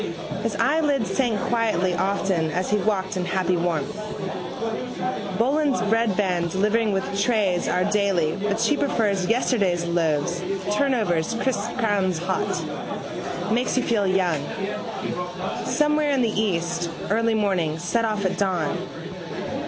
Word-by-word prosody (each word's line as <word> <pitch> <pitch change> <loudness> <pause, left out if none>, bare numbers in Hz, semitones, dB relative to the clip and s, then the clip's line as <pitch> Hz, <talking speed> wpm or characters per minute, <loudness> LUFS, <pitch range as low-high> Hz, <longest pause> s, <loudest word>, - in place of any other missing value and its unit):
His - - -1
eyelids 280 - +2
sank 235 -6 +1
quietly 215 -6 +1
often 190 -2 +1
as 180 +4 -1
he 210 - +4
walked 195 -3 0
in 180 - -1
happy 185 0 +1
warmth. 175 +4 -1 1.4
Boland's 275 +3 +2
breadvan 205 -5 +1
delivering 210 +4 +2
with 195 -1 0 0.2
trays 200 -6 +2
our 180 - +2
daily 200 -6 +2
but 205 +1 0
she 300 - +3
prefers 205 -10 +1
yesterday's 200 -7 +2
loaves 170 0 0 0.3
turnovers 220 - +1
crisp 230 -4 -1
crowns 200 -6 +1
hot. 185 +3 -1 0.9
Makes 250 +2 +1
you 255 - +3
feel 210 -4 +1
young. 180 -6 +1 1.2
Somewhere 300 0 +2
in 270 -3 +2
the 225 - +1
east: 175 -5 0 0.2
early 225 +1 +2
morning: 185 -7 +1
set 175 +8 0
off 215 -3 0
at 185 -1 0
dawn. 185 -6 0
200 Hz, 125 wpm, -24 LUFS, 180-230 Hz, 1.4 s, he